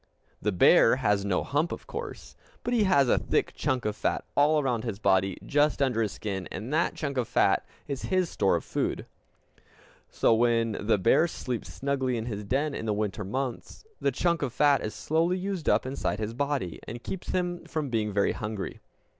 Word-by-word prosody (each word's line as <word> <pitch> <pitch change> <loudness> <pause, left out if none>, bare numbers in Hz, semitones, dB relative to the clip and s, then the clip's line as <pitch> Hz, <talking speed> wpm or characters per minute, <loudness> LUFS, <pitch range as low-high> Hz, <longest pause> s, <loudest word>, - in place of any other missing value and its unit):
The 105 - +1
bear 100 +5 +6
has 105 -6 +1
no 100 -2 0
hump, 150 +5 0
of - - -6
course, - - -7 0.3
but 245 - -1
he 225 -4 +3
has 140 -9 +4
a - - +3
thick - - 0
chunk 130 -3 -1
of 105 -1 -1
fat 105 - -1
all 150 +2 +4
around 125 -6 0
his 115 -5 -3
body 95 -2 +2
just 145 +1 +2
under 130 -5 +1
his 105 -3 0
skin; 95 -4 -4
and 120 +7 -5
that 165 +2 +1
chunk 140 -3 -3
of 125 -3 0
fat - - +3 0.2
is 140 -2 -4
his 185 -2 +1
store 95 - +1
of 85 - -2
food. - - -2 1.0
So, - - +3
when 115 0 +2
the 105 +1 +1
bear 115 - +4
sleeps 125 -7 -5
snugly 130 -3 -1
in 110 - -3
his 105 -3 -4
den 140 +8 0
in 115 - -4
the 105 - +1
winter 105 0 -2
months, 130 - -4
the 140 - +1
chunk 170 +5 0
of 135 -4 -1
fat 145 0 +4
is 110 - -4
slowly 165 +4 +1
used 185 -3 -2
up - - +3
inside 130 -5 -2
his 110 +1 -3
body, 140 - -2
and 120 +1 -7
keeps 190 - -6
him 175 -1 -1
from 155 -3 -3
being 110 -2 0
very 100 0 +2
hungry. 105 -2 -5
125 Hz, 200 wpm, -28 LUFS, 105-150 Hz, 1.0 s, bear